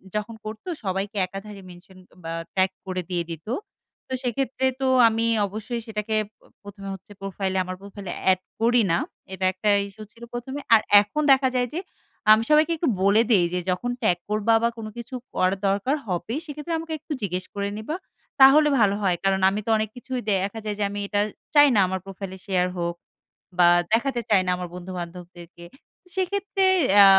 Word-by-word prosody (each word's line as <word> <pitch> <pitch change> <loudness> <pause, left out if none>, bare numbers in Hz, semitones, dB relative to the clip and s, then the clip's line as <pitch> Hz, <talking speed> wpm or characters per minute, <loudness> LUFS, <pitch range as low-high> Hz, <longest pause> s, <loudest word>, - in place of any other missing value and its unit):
যখন 210 +2 -3
করতো 215 +10 -8 0.2
সবাইকে 195 +2 -2
একাধারে 195 +2 -9
মেনশন 180 +1 -15
এ - - -25 0.2
বা, 165 - -5 0.2
ট্যাগ 190 0 +3
করে 185 -1 -3
দিয়ে 175 -2 -1
দিতো। 165 +7 -7 0.6
তো - - -6
সেক্ষেত্রে 260 +1 -1 0.2
তো 265 - +2 0.2
আমি 225 +1 0 0.2
অবশ্যই 220 +4 -5
সেটাকে 215 0 -2 0.2
প - - -57 0.2
১ম 205 0 -11
এ - - -4
হচ্ছে 190 +2 -17
প্রোফাইল 195 -1 -3
আমার 185 0 -5
প্রোফাইল 200 -1 -10 0.2
এড 185 - +1 0.2
করি 235 +1 +4
না। 170 - +3 0.4
এটা 190 0 -2
একটা 200 +3 -1 0.2
ইস্যু 215 +2 -11
ছিল 235 0 -15
১ম 240 +2 -5
এ। - - -7
আর 215 - +4 0.2
এখন 210 +9 -3
দেখা 265 -1 +5
যায় 245 0 +2
যে 335 - -2 0.5
আমি 220 +1 +6
সবাইকে 305 +2 +5
একটু 315 -2 +1
বলে 200 +3 +5
দেই 185 -5 +5
যে, 180 - 0
"যখন 245 +7 -2
ট্যাগ 175 - +2
করবা 215 +2 +2
বা, 235 - +4
কোন 225 - -6
কিছু 240 +2 -7 0.2
করার 185 +1 +2
দরকার 200 +8 +1
হবে, 180 +3 -3
সেক্ষেত্রে 300 +2 -5
আমাকে 325 0 -6
একটু 305 - -6
জিজ্ঞেস 185 -2 -2
করে 200 0 -1
নিবা।" 220 +9 -4 0.5
তাহলে 295 +3 +8
ভালো 200 -2 +4
হয়। 185 -3 +1
কারণ, 195 0 +2
আমি 200 - -2
তো - - -4
অনেক 215 0 -1
কিছুই 255 0 -4
দেখা 195 +3 -1
যায় 210 -1 -2
যে, - - +1
আমি 205 0 -5
এটা 205 0 +1 0.3
চাই 290 0 +8
না - - +5
আমার 190 0 -2
প্রোফাইলে 195 -1 -7
শেয়ার 180 -3 +1
হোক, 170 0 -2 0.6
বা 175 - +7 0.3
দেখাতে 240 +1 +1
চাই 205 -3 +5
না 180 - +1
আমার 180 -1 -5
বন্ধু-বান্ধবদেরকে। 175 -1 -8 0.5
সেক্ষেত্রে 385 +1 0 0.3
অ্যা 200 -1 +9
205 Hz, 190 wpm, -24 LUFS, 185-240 Hz, 0.6 s, অ্যা